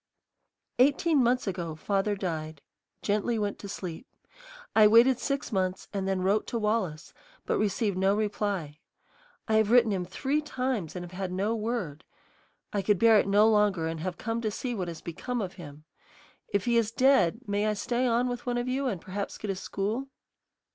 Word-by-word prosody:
"Eighteen 285 Hz, +3 st, +4 dB
months 250 Hz, +1 st, +2 dB
ago 175 Hz, -5 st, -3 dB
father 200 Hz, +5 st, 0 dB
died, 155 Hz, -6 st, -4 dB, 0.4 s
gently 210 Hz, +3 st, 0 dB
went 205 Hz, -2 st, -2 dB
to 200 Hz, -, -8 dB
sleep. 180 Hz, +3 st, -6 dB, 0.7 s
I 215 Hz, -1 st, +8 dB
waited 235 Hz, +4 st, +6 dB
six 275 Hz, -1 st, -2 dB
months 185 Hz, -2 st, -1 dB
and 195 Hz, -1 st, -2 dB
then 190 Hz, -1 st, 0 dB
wrote 200 Hz, +3 st, +1 dB
to 235 Hz, -, -2 dB
Wallace, 210 Hz, -8 st, -1 dB, 0.3 s
but -, -, 0 dB
received 205 Hz, -2 st, 0 dB
no 195 Hz, +1 st, +3 dB
reply. 205 Hz, -7 st, -2 dB, 0.7 s
I 220 Hz, -1 st, +3 dB
have 220 Hz, -1 st, +3 dB
written 235 Hz, -2 st, +5 dB
him 190 Hz, -2 st, -1 dB
three 270 Hz, +11 st, -1 dB
times 255 Hz, -, -3 dB
and 175 Hz, -1 st, -5 dB
have 175 Hz, -, -12 dB
had 185 Hz, 0 st, -4 dB
no 200 Hz, +5 st, 0 dB
word. 215 Hz, -9 st, -3 dB, 0.7 s
I 205 Hz, -, +1 dB
could 205 Hz, 0 st, +2 dB
bear 225 Hz, +2 st, +6 dB
it -, -, 0 dB
no 205 Hz, +2 st, +5 dB
longer 210 Hz, -6 st, +3 dB
and 165 Hz, 0 st, -3 dB
have 180 Hz, +1 st, -4 dB
come 230 Hz, 0 st, -3 dB
to 220 Hz, -, 0 dB
see 245 Hz, +4 st, -4 dB
what 190 Hz, -6 st, -3 dB
has 165 Hz, -2 st, -7 dB
become 240 Hz, +9 st, -4 dB
of 190 Hz, -4 st, -3 dB
him. 145 Hz, -1 st, -11 dB, 0.6 s
If 200 Hz, -1 st, -1 dB
he 235 Hz, -1 st, +3 dB
is 225 Hz, -2 st, +2 dB
dead, 250 Hz, -5 st, +3 dB
may 205 Hz, +1 st, 0 dB
I 215 Hz, -, +2 dB
stay 245 Hz, +4 st, 0 dB
on 240 Hz, +1 st, +2 dB
with 245 Hz, 0 st, -5 dB
one 245 Hz, 0 st, 0 dB
of 240 Hz, +1 st, -2 dB
you 265 Hz, +2 st, -1 dB
and 200 Hz, -8 st, -2 dB
perhaps 200 Hz, +4 st, -5 dB
get 210 Hz, -, -3 dB
a -, -, -3 dB
school? 210 Hz, +7 st, -3 dB
210 Hz, 190 wpm, -28 LUFS, 185-235 Hz, 0.7 s, I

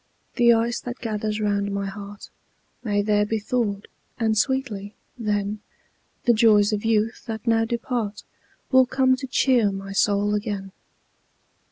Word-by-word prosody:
The 240 Hz, -1 st, +5 dB
ice 235 Hz, +1 st, +1 dB
that 245 Hz, 0 st, -6 dB
gathers 215 Hz, -1 st, -3 dB
round 200 Hz, -1 st, 0 dB
my 200 Hz, 0 st, -2 dB
heart 200 Hz, +1 st, -9 dB, 0.5 s
May 205 Hz, -3 st, 0 dB
there 210 Hz, 0 st, +2 dB
be 220 Hz, +2 st, -1 dB
thawed; 210 Hz, -2 st, -2 dB, 0.3 s
and 220 Hz, -2 st, +1 dB
sweetly, 220 Hz, -4 st, -1 dB, 0.2 s
then, 210 Hz, -2 st, -2 dB, 0.6 s
The 240 Hz, -, +4 dB
joys 215 Hz, -2 st, +4 dB
of 205 Hz, -, -2 dB
youth, 225 Hz, 0 st, 0 dB
that 220 Hz, -1 st, -5 dB
now 225 Hz, -1 st, +3 dB
depart, 230 Hz, -2 st, -3 dB, 0.5 s
Will 260 Hz, -1 st, +6 dB
come 260 Hz, 0 st, +3 dB
to 265 Hz, 0 st, -6 dB
cheer 245 Hz, -4 st, +3 dB
my 195 Hz, 0 st, -6 dB
soul 205 Hz, +1 st, +2 dB
again. 205 Hz, -2 st, -3 dB
215 Hz, 145 wpm, -24 LUFS, 205-235 Hz, 0.6 s, Will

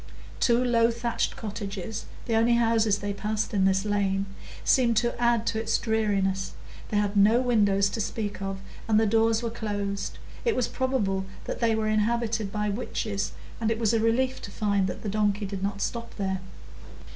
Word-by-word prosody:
Two 240 Hz, +1 st, +3 dB
low 230 Hz, -1 st, +4 dB
thatched 235 Hz, 0 st, -1 dB
cottages—the 210 Hz, +2 st, -5 dB
only 230 Hz, +1 st, +4 dB
houses 225 Hz, -3 st, +3 dB
they 205 Hz, 0 st, -3 dB
passed 215 Hz, +2 st, -2 dB
in 195 Hz, -2 st, +3 dB
this 190 Hz, +1 st, +2 dB
lane—seemed 205 Hz, +4 st, 0 dB
to 240 Hz, +1 st, 0 dB
add 235 Hz, -1 st, +3 dB
to 220 Hz, -, 0 dB
its 225 Hz, -, +1 dB
dreariness; 200 Hz, -4 st, 0 dB, 0.4 s
they 210 Hz, -, 0 dB
had 205 Hz, 0 st, +1 dB
no 210 Hz, +4 st, +5 dB
windows 205 Hz, -6 st, +3 dB
to 220 Hz, -, -2 dB
speak 210 Hz, -1 st, -3 dB
of, 195 Hz, 0 st, -4 dB, 0.3 s
and 215 Hz, -1 st, +4 dB
the 225 Hz, -, +3 dB
doors 225 Hz, +1 st, +3 dB
were 230 Hz, -, -2 dB
closed; 205 Hz, -3 st, -3 dB, 0.3 s
it 465 Hz, -, +2 dB
was 250 Hz, -, +1 dB
probable 205 Hz, -8 st, -1 dB, 0.2 s
that -, -, -4 dB
they 230 Hz, -2 st, +2 dB
were 220 Hz, 0 st, 0 dB
inhabitated 215 Hz, -1 st, +1 dB
by 210 Hz, 0 st, -1 dB
witches, 205 Hz, -1 st, -2 dB, 0.3 s
and 225 Hz, -1 st, +1 dB
it 225 Hz, -, 0 dB
was 225 Hz, -1 st, +2 dB
a 225 Hz, -, +3 dB
relief 255 Hz, +4 st, +1 dB
to -, -, -7 dB
find 200 Hz, -2 st, +1 dB
that -, -, -5 dB
the -, -, -3 dB
donkey 205 Hz, 0 st, +1 dB
did 195 Hz, -1 st, -5 dB
not 200 Hz, 0 st, -1 dB
stop 235 Hz, -1 st, -4 dB
there. 190 Hz, -2 st, -1 dB
215 Hz, 180 wpm, -27 LUFS, 200-230 Hz, 0.4 s, no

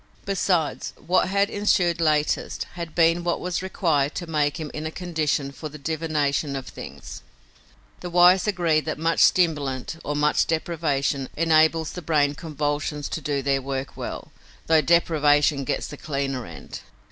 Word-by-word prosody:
Besides, 185 Hz, -5 st, 0 dB
what 180 Hz, +3 st, +1 dB
had 200 Hz, +2 st, +1 dB
ensued 180 Hz, -5 st, +1 dB
latest 155 Hz, -2 st, +1 dB
had 170 Hz, -2 st, -7 dB
been 170 Hz, 0 st, +3 dB
what 175 Hz, 0 st, 0 dB
was 180 Hz, -1 st, -2 dB
required 160 Hz, -7 st, 0 dB
to 175 Hz, -, -4 dB
make 150 Hz, -2 st, 0 dB
him 155 Hz, -2 st, -5 dB
in 155 Hz, +1 st, -4 dB
a -, -, -3 dB
condition 155 Hz, -5 st, -2 dB
for 155 Hz, +2 st, -7 dB
the 150 Hz, -, -10 dB
divination 150 Hz, -2 st, -1 dB
of 135 Hz, -2 st, -5 dB
things. -, -, -9 dB, 0.8 s
The 180 Hz, -, -6 dB
wise 180 Hz, +2 st, +5 dB
agree 175 Hz, -6 st, +2 dB
that 155 Hz, 0 st, -4 dB
much 165 Hz, +2 st, 0 dB
stimulant 150 Hz, -5 st, +2 dB
or 145 Hz, -, -3 dB
much 150 Hz, +1 st, +2 dB
deprivation 150 Hz, -5 st, -1 dB
enables 160 Hz, 0 st, +3 dB
the 180 Hz, -, -7 dB
brain 145 Hz, -3 st, +2 dB
convolutions 145 Hz, -1 st, -3 dB
to 160 Hz, -, -4 dB
do 140 Hz, -1 st, -2 dB
their 135 Hz, 0 st, +1 dB
work 135 Hz, 0 st, -4 dB
well, -, -, -6 dB, 0.3 s
though 160 Hz, -1 st, +4 dB
deprivation 150 Hz, -4 st, +3 dB
gets -, -, -1 dB
the 145 Hz, -, -8 dB
cleaner 135 Hz, -4 st, -3 dB
end. -, -, -9 dB
155 Hz, 160 wpm, -24 LUFS, 145-170 Hz, 0.8 s, wise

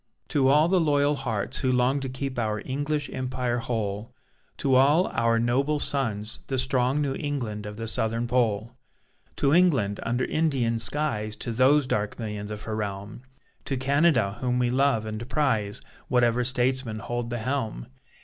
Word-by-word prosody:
To 135 Hz, -3 st, +2 dB
all 150 Hz, +4 st, +5 dB
the 185 Hz, 0 st, +3 dB
loyal 145 Hz, -1 st, +2 dB
hearts 110 Hz, -7 st, -2 dB
who 130 Hz, -, +1 dB
long 125 Hz, +2 st, +2 dB
To 135 Hz, -1 st, -4 dB
keep 130 Hz, 0 st, -4 dB
our 110 Hz, -2 st, -1 dB
English 145 Hz, +2 st, -2 dB
Empire 125 Hz, -1 st, -2 dB
whole! 110 Hz, 0 st, -3 dB, 0.4 s
To 135 Hz, -2 st, +1 dB
all 145 Hz, +7 st, +5 dB
our 115 Hz, 0 st, +1 dB
noble 130 Hz, +6 st, +1 dB
sons, 115 Hz, -7 st, -1 dB
the 135 Hz, -, -2 dB
strong 130 Hz, +3 st, +1 dB
New 135 Hz, -2 st, -1 dB
England 115 Hz, -8 st, -3 dB
of 105 Hz, 0 st, -8 dB
the 115 Hz, 0 st, -4 dB
Southern 115 Hz, +1 st, +1 dB
Pole! 115 Hz, -1 st, 0 dB, 0.6 s
To 140 Hz, 0 st, +2 dB
England 135 Hz, -, +3 dB
under 120 Hz, +2 st, -1 dB
Indian 135 Hz, -8 st, 0 dB
skies, 110 Hz, -6 st, -1 dB
To 120 Hz, -, -5 dB
those 130 Hz, +5 st, +4 dB
dark 105 Hz, -4 st, -2 dB
millions 105 Hz, -2 st, -5 dB
of 105 Hz, 0 st, -6 dB
her 110 Hz, -, -4 dB
realm! 100 Hz, +1 st, -5 dB, 0.4 s
To 135 Hz, -, -1 dB
Canada 130 Hz, -6 st, +2 dB
whom 125 Hz, -1 st, 0 dB
we 125 Hz, -1 st, +1 dB
love 130 Hz, -4 st, +2 dB
and 110 Hz, +3 st, -6 dB
prize, 115 Hz, -10 st, +1 dB, 0.3 s
Whatever 125 Hz, -1 st, +2 dB
statesman 130 Hz, -2 st, 0 dB
hold 120 Hz, +1 st, -4 dB
the 120 Hz, -, -3 dB
helm. 120 Hz, -1 st, -3 dB
125 Hz, 165 wpm, -26 LUFS, 110-140 Hz, 0.6 s, all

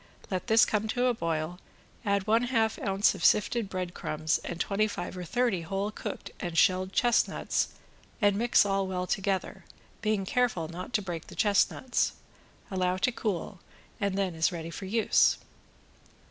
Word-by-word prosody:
Let 185 Hz, -2 st, -2 dB
this 220 Hz, 0 st, +6 dB
come 215 Hz, 0 st, 0 dB
to 245 Hz, +3 st, 0 dB
a 250 Hz, -, +3 dB
boil, 165 Hz, -3 st, -2 dB, 0.4 s
add 200 Hz, -3 st, +1 dB
one 225 Hz, +3 st, +3 dB
half 225 Hz, -3 st, +1 dB
ounce 195 Hz, 0 st, +2 dB
of -, -, -8 dB
sifted 215 Hz, 0 st, +3 dB
bread 185 Hz, -2 st, -4 dB
crumbs 155 Hz, -2 st, -1 dB
and 170 Hz, -, -5 dB
twenty 210 Hz, +3 st, +1 dB
five 175 Hz, -3 st, -5 dB
or 180 Hz, -, -5 dB
thirty 235 Hz, -1 st, 0 dB
whole 195 Hz, +5 st, -2 dB
cooked -, -, -6 dB
and 175 Hz, -3 st, -4 dB
shelled 185 Hz, +2 st, +3 dB
chestnuts 240 Hz, +3 st, +1 dB, 0.5 s
and 205 Hz, -3 st, +3 dB
mix 235 Hz, 0 st, +4 dB
all 195 Hz, -1 st, 0 dB
well 180 Hz, -1 st, -2 dB
together, 195 Hz, 0 st, -2 dB, 0.4 s
being 215 Hz, -2 st, 0 dB
careful 220 Hz, -7 st, 0 dB
not 175 Hz, +6 st, -7 dB
to 210 Hz, -4 st, +1 dB
break 175 Hz, -4 st, -5 dB
the -, -, -11 dB
chestnuts. 210 Hz, +4 st, +2 dB, 0.6 s
Allow 185 Hz, -1 st, 0 dB
to 255 Hz, -, +1 dB
cool 205 Hz, -5 st, -3 dB, 0.4 s
and 200 Hz, -2 st, -1 dB
then 195 Hz, -3 st, 0 dB
is 160 Hz, 0 st, +1 dB
ready 165 Hz, -1 st, -5 dB
for 190 Hz, -, -7 dB
use. 220 Hz, +3 st, +3 dB
195 Hz, 165 wpm, -29 LUFS, 180-220 Hz, 0.6 s, this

